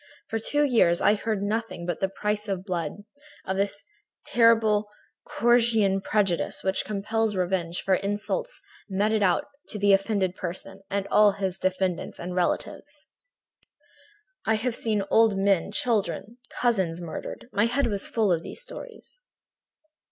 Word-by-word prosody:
For 225 - -1
two 290 +6 +1
years 225 -11 +4
I 205 - +4
heard 215 0 -1
of 195 - -4
nothing 215 -4 -2
but 175 - -2
the 190 - 0
price 210 +2 -2
of 190 -2 -3
blood, 180 +1 -3 0.4
of 190 - -2
this 200 +1 -1 0.4
terrible 220 -3 +4 0.4
Corsican 225 -5 +3
prejudice 195 -4 0
which 190 0 0
compels 215 +1 -1
revenge 175 -2 -1
for 195 - +2
insults 205 - -2 0.3
meted 210 +3 +1
out 185 -4 +2 0.2
to 215 - -4
the 200 -1 +4
offending 195 -2 +1
person 190 +2 -6
and 200 0 -1
all 210 -1 +6
his 190 -2 -3
descendants 185 -1 -1
and 180 +1 -5
relatives. 290 - -2 1.4
I 220 - +2
had 230 +3 -1
seen 215 -3 -1
old 225 -3 +5
men, 195 -1 +2
children, 225 +1 -1
cousins 190 -9 0
murdered; 170 +6 -7
my 205 +2 +3
head 275 +4 +1
was 205 -4 -1
full 220 -4 +1
of 165 -2 +2
these - - -8
stories. - - -9
205 Hz, 145 wpm, -26 LUFS, 190-225 Hz, 1.4 s, all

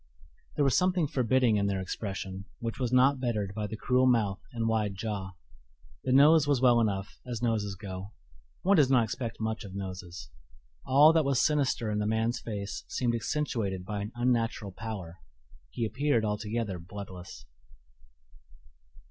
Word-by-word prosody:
There 145 - +2
was 135 - +3
something 180 -2 +2
forbidding 130 -4 +2
in 100 0 +1
their 100 -1 -1
expression, 95 0 -5
which 115 +1 -5
was 125 -2 -1
not 130 +2 +4
bettered 105 -6 -2
by 105 0 -3
the 110 - -6
cruel 125 +3 +2
mouth 105 -6 +2
and 115 -2 -2
wide 105 -3 0
jaw. 95 -2 -4 0.7
The 130 - 0
nose 145 +3 +6
was 145 -3 +3
well 120 -2 +5
enough, 100 -3 -2
as 120 -1 -4
noses 105 -4 0
go; 95 0 -7 0.5
one 195 +1 +4
does 145 -4 +5
not 125 -3 +5
expect 115 +1 -4
much 110 0 -2
of 95 -2 -9
noses. 90 -6 -7 0.6
All 145 +4 +7
that 160 -1 +4
was 140 -3 +1
sinister 140 -7 +1
in 105 - -1
the 105 - 0
man's 110 +2 0
face 100 -3 -5
seemed 120 -2 -1
accentuated 110 -6 -2
by 105 +1 -3
an 105 +2 -5
unnatural 120 -4 0
pallor 95 -4 -7 0.5
he 115 - -2
appeared 120 0 +1
altogether 105 -2 -2
bloodless. 90 -7 -9
110 Hz, 160 wpm, -29 LUFS, 100-125 Hz, 0.7 s, All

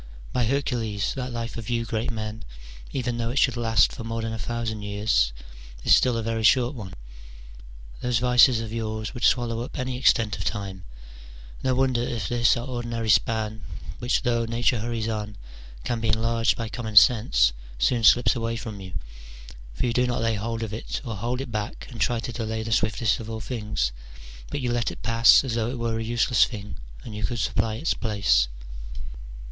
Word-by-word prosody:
By 125 -2 +2
Her 140 +5 +1
cules, 110 -6 -2
that 130 -1 -4
life 115 0 -4
of 115 - -7
you 115 -1 0
great 110 +1 -2
men, 110 -1 -5 0.5
even 120 -3 -2
though 115 0 -1
it 125 - -3
should 130 -3 +3
last 115 -5 +3
for 120 - -7
more 115 0 -3
than 110 0 -3
a 115 - -5
thousand 115 -3 -3
years, 100 - +1 0.5
is - - +5
still 125 -2 +4
a 115 - -2
very 115 0 -1
short 125 +3 +4
one: 100 -8 -8 1.0
those 125 -1 0
vices 125 0 +5
of 110 -1 -6
yours 110 -1 -3
would 125 - -7
swallow 120 -2 +2
up 120 - -7
any 130 -1 -2
extent 110 -6 +3
of - - -3
time: 95 -3 -4 0.8
no 130 -1 +2
wonder 130 -2 +2
if 120 -2 -2
this 120 0 +3
our 120 - -4
ordinary 120 -3 -2
span, 110 +2 +1 0.4
which, 120 +1 0
though 120 -1 +1
Nature 115 +1 +1
hurries 115 0 -2
on, 105 -2 -3 0.5
can 120 - -1
be 115 - -2
enlarged 115 +1 +2
by 115 - -3
common 110 -2 -6
sense, 100 - +6 0.2
soon 115 - +1
slips 115 -1 +6
away 115 -1 -2
from 110 -3 -7
you: 95 -1 -9 0.8
for - - -1
you 120 - 0
do 125 +1 +2
not 120 -2 -1
lay 115 0 +2
hold 115 +2 -3
of 110 -2 -5
it 110 - -4
or 115 -3 -4
hold 120 +6 -2
it 135 - -6
back, 110 +2 -4
and 115 -3 -7
try 120 -1 +2
to 120 +1 -5
delay 110 -1 -3
the 115 - -5
swiftest 110 +2 +1
of 110 -1 -7
all 110 0 -4
things, 105 - -2 0.6
but - - -3
you 125 -1 -1
let 120 -1 0
it - - -10
pass 115 +1 +6
as 130 -4 -3
though 115 0 0
it 130 - -4
were 115 -1 -1
a - - -2
useless 120 +1 +3
thing 105 -2 -8 0.3
and 110 - -8
you 105 - -5
could 120 +3 -1
supply 110 +2 0
its 155 +9 0
place. 100 - +2
115 Hz, 200 wpm, -25 LUFS, 110-120 Hz, 1.0 s, sense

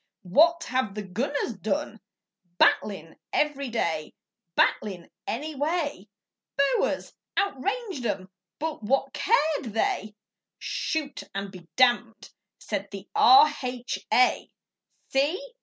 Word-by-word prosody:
What 330 - +4
have 255 -5 -1
the 210 - -4
gunners 240 +7 -2
done 285 - -2 0.6
Battlin' 175 -6 +2
every 280 -3 0
day, 165 -9 -2 0.4
Battlin' 185 -5 +1 0.2
any 300 +7 -3
way. 290 - -2 0.5
Boers 280 -1 +1 0.2
outranged 400 - -1
'em, 190 -2 -3 0.3
but 315 -2 -3
what 270 +5 0
cared 310 - +2
they? 225 - -1 0.4
'Shoot 300 -3 -3
and 200 0 -3
be 180 -3 -12
damned,' 240 -3 +2 0.3
said 205 -1 -4
the 195 0 -9
R.H.A.! 255 -2 +4 0.6
See! 350 - 0
260 Hz, 100 wpm, -26 LUFS, 210-300 Hz, 0.6 s, What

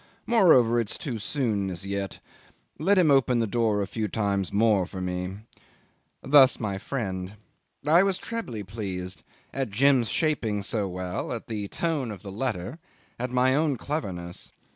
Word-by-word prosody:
Moreover, 130 - +5
it's 115 -3 -2
too 135 - -4
soon 105 -5 -1
as 90 +1 -6
yet. 100 -1 -4 0.6
Let 195 +6 +3
him 170 -5 +5
open 135 -2 +4
the 115 - +2
door 110 -2 +1
a - - -2
few 105 +3 -3
times 100 -2 -1
more 105 -3 +3
for 95 - -7
me... 90 +2 -4 0.4
." - - -41
Thus 135 -2 +6
my 100 -4 -2
friend. 95 -6 -4 0.5
I 160 +4 +6
was 195 -1 +2
trebly 195 - -5
pleased 95 -3 -5 0.3
at 135 -3 -2
Jim's 125 +2 +3
shaping 115 -10 0
so 105 0 0
well, 90 0 -4
at 120 -2 -4
the 105 -3 -4
tone 150 -1 -2
of 100 -2 -8
the 100 - -7
letter, 110 - -3 0.4
at 125 +1 -2
my 125 +1 +3
own 145 -2 +1
cleverness. 90 - -5
110 Hz, 165 wpm, -26 LUFS, 100-135 Hz, 0.6 s, Thus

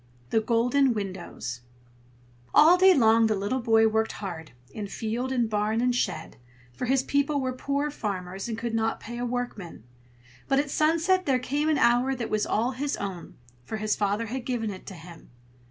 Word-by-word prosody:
THE 225 - +3
GOLDEN 245 +3 +2
WINDOWS 185 - -5 0.9
All 320 +4 +8
day 375 0 +6
long 225 -3 +5
the 215 - +1
little 205 +6 -1
boy 225 -2 +4
worked 220 0 0
hard, 170 -8 -7 0.2
in 210 -2 -5
field 230 +5 -3
and 245 -3 +1
barn 215 +1 0
and 250 +1 +2
shed, - - -2 0.4
for 185 - -4
his 265 +1 +2
people 285 +1 +1
were 260 -1 -2
poor 280 +3 -2
farmers, 195 -4 -4
and 225 - -3
could 230 0 -4
not 225 0 0
pay 240 +1 -7
a 245 - -2
workman; 235 - -5 0.6
but 270 - +2
at 280 0 0
sunset 335 +5 +2
there 265 -2 +3
came 285 +5 -1
an 310 - +2
hour 245 +2 +3
that 235 -2 -5
was 215 -1 0
all 235 +4 +1
his 275 +3 -3
own, 190 -4 -6 0.3
for 220 - -5
his 215 0 0
father 205 +2 0
had 250 +3 -5
given 235 -4 -2
it 185 - -10
to 190 - -7
him. 165 0 -13
230 Hz, 185 wpm, -26 LUFS, 210-265 Hz, 0.9 s, All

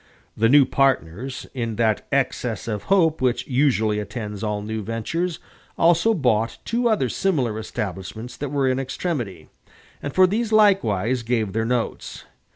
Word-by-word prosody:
The 115 +1 +3
new 140 +1 +7
partners, 130 -2 0
in 115 -4 -3
that 110 -1 0
excess 125 -5 -1
of 105 -3 -3
hope 165 -6 +3
which 125 -1 +1
usually 125 -6 +1
attends 105 -1 -6
all 105 -1 -2
new 110 +1 -4
ventures, 135 - -2 0.4
also 170 +7 +4
bought 115 - +1
two 235 +1 +1
other 210 - +2
similar 125 - 0
establishments 110 +2 -5
that 145 - -4
were 140 -1 +1
in 130 0 +1
extremity, 130 - -4 0.5
and 140 - -4
for 185 +4 +5
these 220 +4 -1
likewise 130 - +3
gave 115 -4 -1
their 110 +1 0
notes. 120 -1 -3
125 Hz, 150 wpm, -23 LUFS, 110-150 Hz, 0.5 s, new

